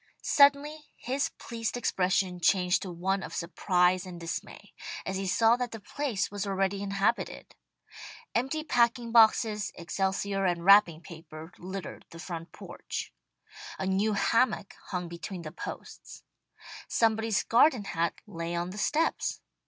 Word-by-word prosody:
Suddenly 290 +2 +3
his 270 +3 -2
pleased 230 0 -4
expression 185 -4 0
changed 180 +1 +3
to 185 - -5
one 190 +3 -1
of - - -7
surprise 180 +1 +1
and 180 -2 -9
dismay, 165 -1 -7 0.3
as 190 - -3
he 195 0 -2
saw 225 +5 +4
that 250 -1 -2
the 225 - -8
place 230 0 -2
was 205 0 -3
already 195 0 0
inhabited. 200 +3 -1 0.8
Empty 270 +6 -1
packing 235 -4 +1
boxes, 220 -2 +4
excelsior 195 +3 -1
and 175 -2 0
wrapping 195 -5 +6
paper 160 -1 -11
littered 190 +1 -7
the 165 - -12
front 165 -1 -7
porch. - - -7 0.6
A - - -3
new 195 +3 +1
hammock 230 0 +1
hung 180 -2 -3
between 170 +1 -7
the 155 - -7
posts. - - -9 0.6
Somebody's 220 -1 +1
garden 245 -1 +4
hat 170 -3 -2
lay 170 +1 -5
on 175 +1 -2
the 205 - -7
steps. 315 +8 0
195 Hz, 135 wpm, -29 LUFS, 180-230 Hz, 0.8 s, wrapping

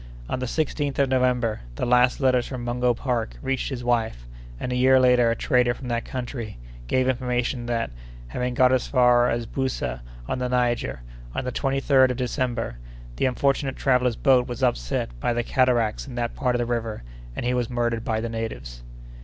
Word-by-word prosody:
On 130 - -2
the 125 - -2
16th 145 0 -1
of 140 -1 +2
November, 125 -4 +1
the - - -2
last 125 +1 +4
letters 130 -3 +2
from 125 -3 -5
Mungo 120 0 +1
Park 120 - -2
reached 135 - -2
his 125 -3 -5
wife; 115 - 0 0.3
and, 125 - -3
a - - 0
year 130 +1 +5
later 125 -2 +5
a 115 - +1
trader 120 0 +2
from 125 -1 -8
that 120 0 -1
country 120 - -5 0.3
gave 130 - +2
information 125 -1 -1
that, 115 - -1 0.4
having 125 - -2
got 130 0 +5
as 130 -1 +1
far 125 -2 +4
as 115 0 -1
Boussa, 115 - -3 0.3
on - - -2
the 125 0 -1
Niger, 120 - 0 0.3
on - - -1
the 125 - -2
23d 135 -1 +3
of 125 - -2
December, 120 - -2 0.4
the - - +2
unfortunate 135 +1 0
traveller's 125 -3 +2
boat 130 -2 +3
was 120 -2 -5
upset - - 0
by 120 - 0
the 120 0 0
cataracts 120 -2 +1
in 130 - -8
that 120 -1 -2
part 125 -2 0
of - - +2
the 120 - 0
river, 115 - -3 0.3
and - - -4
he 125 - +1
was 125 -2 -1
murdered 120 -2 -1
by 110 -1 -1
the 115 - -3
natives." 110 - -5
125 Hz, 195 wpm, -24 LUFS, 120-130 Hz, 0.4 s, year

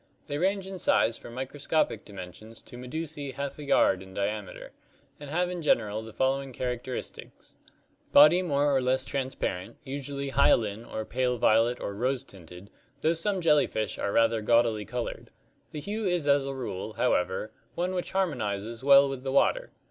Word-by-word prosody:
They 145 -1 -3
range 195 +2 +1
in 190 -1 -7
size 115 - +3
from 120 - -10
microscopic 135 -2 -1
dimensions 100 +3 -10
to - - -12
medusae 140 +2 -6
half 140 +1 -5
a - - -6
yard 95 -9 +3
in 95 0 -12
diameter, 100 0 -4 0.5
and 145 -1 -9
have 175 +4 +1
in 180 -1 -4
general 110 -8 +1
the 110 0 -10
following 135 +2 -1
characteristics: 125 0 -6 0.6
Body 155 +5 +8
more 145 -4 +1
or 135 - +3
less 130 +1 +1
transparent, 130 -9 -3
usually 140 0 -4
hyaline 110 -4 +2
or 110 -2 -5
pale 125 +1 0
violet 115 +2 +3
or 100 - -4
rose 130 +5 -1
tinted, 90 -2 -13 0.3
though 160 - +3
some 185 +3 -1
jellyfish 145 - +2
are 100 - -1
rather 115 0 +3
gaudily 115 -1 +2
colored. 120 +2 -5 0.4
The 150 - -6
hue 210 +4 -3
is 175 -5 0
as 140 -1 +3
a 135 - -4
rule, 110 -5 -5
however, 95 -3 0 0.2
one 180 +2 -1
which 180 -1 -3
harmonizes 115 - -2
well 140 0 +7
with 135 -2 -5
the 135 - -2
water. - - +2
130 Hz, 165 wpm, -28 LUFS, 110-145 Hz, 0.6 s, Body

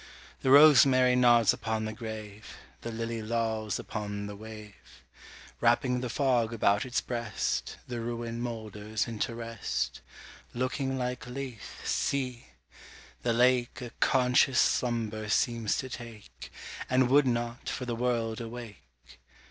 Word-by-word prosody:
The 130 - 0
rosemary 135 -3 +7
nods 120 -3 +5
upon 110 -1 -2
the 110 - -4
grave; 110 -2 -8 0.2
The 115 - -5
lily 115 0 -3
lolls 110 -2 -1
upon 105 -1 -5
the 100 0 -6
wave; 105 -1 -12 0.6
Wrapping 125 +1 +2
the 125 - -3
fog 125 -4 +1
about 105 +1 +2
its 125 - 0
breast, 115 -4 -2
The 120 -2 -4
ruin 115 0 -4
moulders 110 -2 -3
into 115 +1 -3
rest; 115 -2 -3 0.5
Looking 130 +2 -1
like 125 -1 -3
Lethe, 125 -3 -7
see! 130 -3 -1 0.7
the 120 - +1
lake 125 +1 +2
A 120 -2 -7
conscious 125 0 +3
slumber 110 -3 0
seems 115 0 +1
to 130 - -3
take, 115 -4 -10 0.4
And 130 0 +4
would 140 +2 +5
not, 120 0 -2
for 125 - -4
the 120 - -2
world, 115 -2 -1
awake. 70 - -11
115 Hz, 130 wpm, -29 LUFS, 110-125 Hz, 0.7 s, rosemary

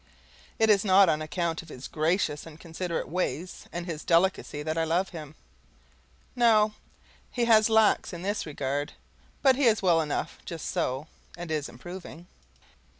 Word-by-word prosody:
It 220 -1 +4
is 200 -2 +4
not 195 -2 +6
on 155 -1 +1
account 165 +1 -2
of 165 - -16
his 130 -3 -8
gracious 155 -1 0
and 160 -1 -12
considerate 170 0 -4
ways 180 0 -3
and 170 0 -5
his 160 -3 -5
delicacy 170 -3 +1
that 155 +1 -2
I 165 - +1
love 175 +4 0
him. 155 -3 -9 1.0
No, 220 -3 +4 0.6
he 240 -2 -1
has 220 -1 +5
lacks 220 -1 +3
in 175 -1 -7
this 205 -2 -2
regard, 145 0 -3 0.5
but 265 -2 +5
he 280 - +2
is 220 -3 +3
well 170 -3 +4
enough 150 -2 -3
just 165 -2 -7
so, 130 +4 -1 0.3
and 175 -2 -6
is 150 -2 -2
improving. 175 -1 -10
170 Hz, 160 wpm, -27 LUFS, 155-200 Hz, 1.0 s, not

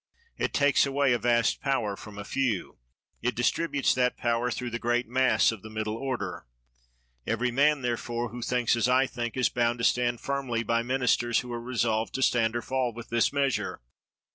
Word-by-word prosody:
It - - -1
takes 145 -1 +3
away 140 -1 +2
a 120 - +1
vast 120 -2 +2
power 120 -8 0
from 105 0 -11
a 105 - -5
few. 120 - -2 0.4
It 125 +1 -1
distributes 140 +4 +1
that 125 -1 +1
power 120 +1 0
through 120 +1 -4
the 120 - -3
great 120 +1 0
mass 130 +1 +3
of 110 -4 -8
the 110 - -10
middle 110 0 -3
order. 115 - -4 0.8
Every 125 0 0
man, 145 +2 +3
therefore, 120 0 -2
who 120 +2 -8
thinks 125 0 +1
as 120 +1 +1
I 130 +1 +4
think, 120 -2 -5
is 130 - +3
bound 120 0 0
to 115 - -1
stand 120 -1 +2
firmly 130 -3 -2
by 115 +1 +1
ministers 120 -1 +1
who 125 -1 -7
are 120 - -4
resolved 115 -3 -1
to 135 - 0
stand 115 -2 +2
or 120 - -2
fall 130 -2 -1
with 120 -1 -9
this 115 -1 +2
measure. 140 -2 -1
120 Hz, 190 wpm, -27 LUFS, 115-130 Hz, 0.8 s, I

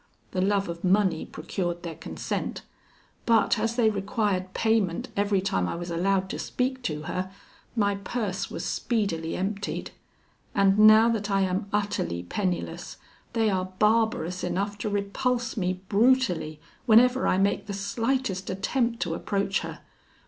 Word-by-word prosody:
The 185 - -1
love 200 +1 +1
of 170 0 -6
money 190 -3 +2
procured 175 +2 -4
their 170 -2 -4
consent; - - -4 0.6
but 230 -1 +4
as 225 +2 0
they 225 -3 +4
required 200 -2 -1
payment 220 -6 +1
every 200 -1 +2
time 95 - 0
I - - -3
was 175 0 -5
allowed 190 +3 +1
to - - -4
speak 260 +1 -2
to 150 -1 -2
her, 185 +3 -3 0.4
my 205 -3 +2
purse 200 -1 -3
was - - -5
speedily 190 -9 -1
emptied; 200 +2 -3 0.6
and 195 0 +4
now 215 +1 +8
that 210 -3 -1
I 195 -1 +2
am 190 +1 0
utterly 205 - -1
penniless, 180 - -3 0.4
they 225 -2 +2
are 185 -1 -2
barbarous 215 -5 +2
enough 195 +3 -1
to 215 - -2
repulse 235 +5 -1
me 185 -2 -1
brutally, 200 -9 +2 0.3
whenever 250 +3 +5
I - - +3
make 200 +1 +1
the 200 - -4
slightest 200 0 -1
attempt 230 +5 -1
to 165 - -1
approach 195 +2 -1
her. - - -7
200 Hz, 150 wpm, -27 LUFS, 185-220 Hz, 0.6 s, now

